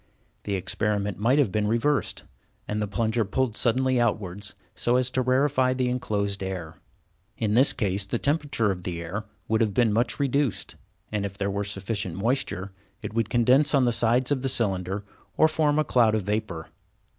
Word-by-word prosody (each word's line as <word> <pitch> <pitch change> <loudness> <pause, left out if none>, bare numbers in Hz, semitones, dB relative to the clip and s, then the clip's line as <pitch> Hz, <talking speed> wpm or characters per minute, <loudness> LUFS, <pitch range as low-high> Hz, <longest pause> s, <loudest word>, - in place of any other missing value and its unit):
The 100 - -1
experiment 100 +1 -1
might 120 +6 +3
have 140 -10 +3
been 105 +1 0
reversed, 120 +6 0 0.4
and 105 0 -2
the 105 - -1
plunger 110 +3 0
pulled 110 +3 -1
suddenly 130 +1 +2
outwards 100 -4 -1 0.2
so 120 - +1
as 125 0 +1
to 130 - +1
rarefy 130 0 +2
the 130 -1 0
enclosed 100 -5 -1
air. 95 -4 -5 0.6
In 105 -2 0
this 130 +5 +5
case 100 -2 -1
the 120 - -1
temperature 145 -7 +1
of 90 -2 -5
the 85 -1 -4
air 95 +6 -5 0.2
would 110 +1 +1
have 105 -3 +1
been 115 -4 +3
much 115 +4 0
reduced, 140 -3 0 0.4
and, 105 -1 -1
if 100 0 -5
there 100 0 -1
were 100 +1 -1
sufficient 100 -2 -2
moisture, 100 -3 -1 0.3
it - - -5
would 115 -1 0
condense 130 +5 +4
on 135 -2 +4
the 120 - +3
sides 120 +3 +2
of 135 -3 +1
the 135 - -1
cylinder 95 -4 -1 0.3
or 155 - +6
form 155 -2 +1
a 155 - +3
cloud 115 -6 +3
of 110 - -1
vapor. 100 -5 -3
110 Hz, 185 wpm, -26 LUFS, 100-130 Hz, 0.6 s, or